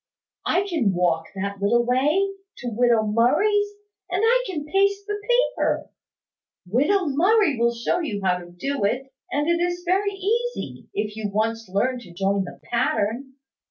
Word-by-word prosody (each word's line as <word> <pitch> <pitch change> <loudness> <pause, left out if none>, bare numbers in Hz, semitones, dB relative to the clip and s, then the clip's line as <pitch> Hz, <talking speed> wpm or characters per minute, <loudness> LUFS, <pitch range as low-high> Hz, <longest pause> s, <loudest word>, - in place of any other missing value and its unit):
I 370 - +2
can 270 - +1
walk 165 -2 +1
that 200 +1 -4
little 235 +4 +3
way, 295 +11 +2 0.3
to 245 - -4
widow 235 -1 +3
Murray's; 395 - +3 0.4
and 365 +4 0
I - - +4
can 310 -6 -4
paste 395 +4 +1
the 415 0 -4 0.3
paper. - - -1 0.8
Widow 295 - +2
Murray 345 - +3
will 235 0 +2
show 235 +9 0
you 250 -12 -3
how 180 -1 +2
to 175 -1 -11
do 270 +9 -3
it; 260 +6 -1 0.2
and 295 +2 0
it 340 0 +2
is 355 0 -2
very 390 +3 +1
easy, 465 +6 -2
if 210 - -2
you 215 -2 -3
once 225 0 -1
learn 250 +7 0
to 180 -7 -13
join 195 +2 0
the - - -10
pattern. 240 +2 -1
255 Hz, 160 wpm, -24 LUFS, -, 0.8 s, I